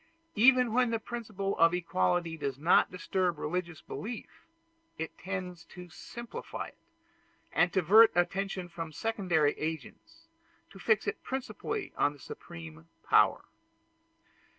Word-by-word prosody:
Even 250 +1 +5
when 250 0 +3
the 230 - +1
principle 215 -4 -4
of 165 +1 +5
equality 165 - 0
does 140 -4 -3
not 160 +5 +4
disturb 180 -1 -1
religious 175 +2 -3
belief, 225 +2 -7 0.5
it 160 +1 -5
tends 180 -2 -5
to 180 -1 -11
simplify 235 +7 -7
it, - - -25 0.7
and 175 0 +3
to 190 - +2
divert 215 +7 +7
attention 190 +1 0
from 165 -2 -6
secondary 175 -6 +1
agents, 160 - -6 0.4
to 195 - -13
fix 215 +2 +2
it - - -3
principally 315 - -4
on 145 - +2
the 145 - -17
Supreme 165 +1 -10 0.2
Power. - - +4
180 Hz, 130 wpm, -30 LUFS, 165-220 Hz, 0.7 s, divert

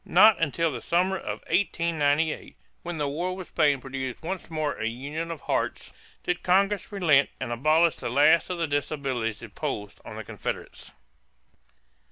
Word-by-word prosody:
Not 205 +3 +6
until 165 +1 +1
the 120 -4 -5
summer 180 +6 +1
of - - -5
1898, 160 -5 0 0.2
when 175 -1 -5
the 145 -1 0
war 175 +6 -2
with 185 -1 -8
Spain 145 -4 +3
produced 130 +1 -5
once 185 +1 -4
more 155 -3 -1
a 110 - -1
union 145 +8 -4
of 165 -3 -6
hearts, - - -2 0.3
did 180 - -1
Congress 195 +3 +2
relent 155 -9 +4
and 130 -2 -4
abolish 155 +7 +3
the - - -4
last 145 +6 +4
of 180 - -2
the 170 - 0
disabilities 135 -6 -2
imposed 105 -2 -5
on - - -9
the - - -6
Confederates. - - -5
155 Hz, 160 wpm, -27 LUFS, 135-175 Hz, 0.3 s, Not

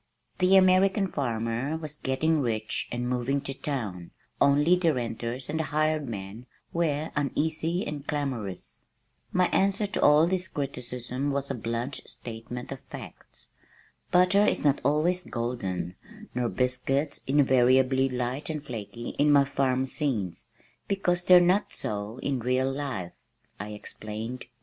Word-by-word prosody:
The 185 +1 +5
American 190 +1 +5
farmer 120 +2 -1
was 155 -2 -5
getting 155 +4 +1
rich, 110 -5 -2
and 120 0 -2
moving 125 +3 0
to 135 -1 -4
town, 110 - -4 0.3
only 145 +5 +5
the 170 -4 +2
renters 120 +1 -4
and 155 +2 -2
the 160 - 0
hired 155 -1 0
man 105 +3 -7 0.3
were 155 -2 0
uneasy 160 - 0
and 145 -1 -6
clamorous. 130 -10 -4 0.5
My 185 0 +3
answer 200 +2 +2
to 205 - -3
all 150 +2 +6
this 185 +1 0
criticism 125 -2 -4
was 140 0 -1
a - - -1
blunt 120 +3 -3
statement 120 +2 -8
of 135 - -5
facts. - - -10 0.6
"Butter 180 +3 +5
is - - +1
not 145 -2 +3
always 155 +6 +2
golden 95 -8 -3 0.4
nor 125 -1 0
biscuits 135 +4 0
invariably 130 -1 +4
light 125 +4 -3
and 150 -2 -4
flaky 120 -1 -6
in 145 +1 +5
my 140 -1 +6
farm 130 -2 +1
scenes, 120 - -2 0.4
because 180 -3 0
they're 180 -1 +9
not 180 +4 +2
so 105 +2 -4
in 140 -2 0
real 130 +2 +1
life," 135 -11 -4 0.5
I 105 +2 -5
explained. 110 +3 -6
135 Hz, 140 wpm, -27 LUFS, 120-155 Hz, 0.6 s, they're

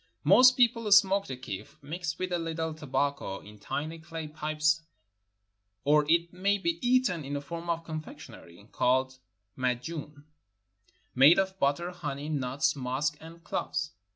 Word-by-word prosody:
Most 255 0 +7
people 230 -3 +2
smoke 200 0 +5
the 130 - -5
kiff, 125 +3 -8
mixed 160 +2 -4
with 185 0 -3
a 175 - 0
little 160 -1 -3
tobacco, 140 -8 -2
in 105 0 -14
tiny 155 +10 -4
clay 160 -1 -7
pipes, 155 +1 0 1.0
or 150 +1 +3
it 170 +1 +2
may 200 +3 +1
be 170 -3 -1
eaten 245 - +2
in 140 +1 -4
a - - -1
form 170 +4 -7
of 165 -1 -1
confectioner^^ 115 - -10
called 130 +1 +1 0.4
mad 125 -1 -1
jun, 150 -1 -7 0.9
made 140 +6 +7
of 190 0 0
butter, 145 +5 +1
honey, 150 -4 -5
nuts, 135 -2 0
musk, 135 +3 -1
and 165 +1 -12
cloves. 155 -2 -3
155 Hz, 150 wpm, -29 LUFS, 140-170 Hz, 1.0 s, Most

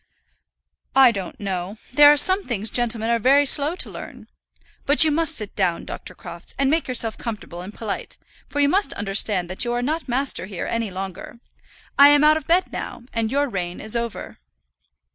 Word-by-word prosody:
"I 265 -2 +7
don't 195 -5 -7
know. 190 0 -4 0.2
There 290 +2 +8
are 295 - +3
some 375 +7 +3
things 220 - -4
gentlemen 235 -2 0
are 235 - +1
very 275 +5 +4
slow 290 +4 +5
to - - -3
learn. - - -10 0.6
But 285 0 +6
you 310 - +2
must 325 +1 -1
sit 210 -3 -8
down, 180 -4 -1
Dr. - - -9
Crofts, - - -10
and 275 0 +1
make 325 +1 0
yourself 235 -3 0
comfortable 210 -6 -7
and 185 +3 -9
polite; 215 -1 -6 0.3
for 290 - -4
you 285 - +4
must 390 +7 +1
understand 195 -2 0
that 185 - -2
you 240 0 -2
are 245 0 -2
not 310 +4 -3
master 255 -5 0
here 190 -3 -6
any 230 -2 -2
longer. 190 +5 -8 0.6
I 280 - +10
am 290 0 +5
out 305 +1 +5
of 310 - -8
bed 350 +3 +1
now, - - -6
and 225 -1 -2
your 285 +1 +1
reign 180 -6 -5
is 215 +2 -3
over." 235 -1 -5
235 Hz, 195 wpm, -22 LUFS, 205-285 Hz, 0.6 s, I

